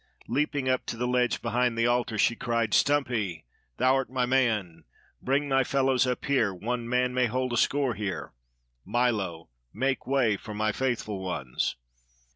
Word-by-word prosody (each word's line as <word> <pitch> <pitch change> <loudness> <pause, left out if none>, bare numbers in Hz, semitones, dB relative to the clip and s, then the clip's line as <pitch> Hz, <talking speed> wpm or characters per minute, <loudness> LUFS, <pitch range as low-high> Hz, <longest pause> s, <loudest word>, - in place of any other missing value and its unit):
Leaping 145 +1 0
up 130 -1 +1
to 115 - -4
the 125 - -1
ledge 125 0 +1
behind 120 0 +1
the 115 - +2
altar, 120 -2 +1
she 120 - +3
cried: 115 -3 -1
"Stumpy! 120 - +1 0.3
Thou'rt 130 0 +2
my 125 -1 0
man. 110 -11 0 0.4
Bring 140 +3 +1
thy 135 -1 +3
fellows 130 -1 +2
up 125 - -2
here; 130 -7 +2
one 115 +6 -4
man 125 0 +1
may 125 -1 +2
hold 130 +2 -1
a - - 0
score 135 0 +2
here. 100 -2 -4 0.5
Milo! 100 - -1 0.2
Make 135 - -1
way 130 -6 +2
for 105 +1 -8
my 110 +1 +1
faithful 115 -4 -2
ones!" 80 -9 -2
125 Hz, 160 wpm, -27 LUFS, 110-130 Hz, 0.5 s, she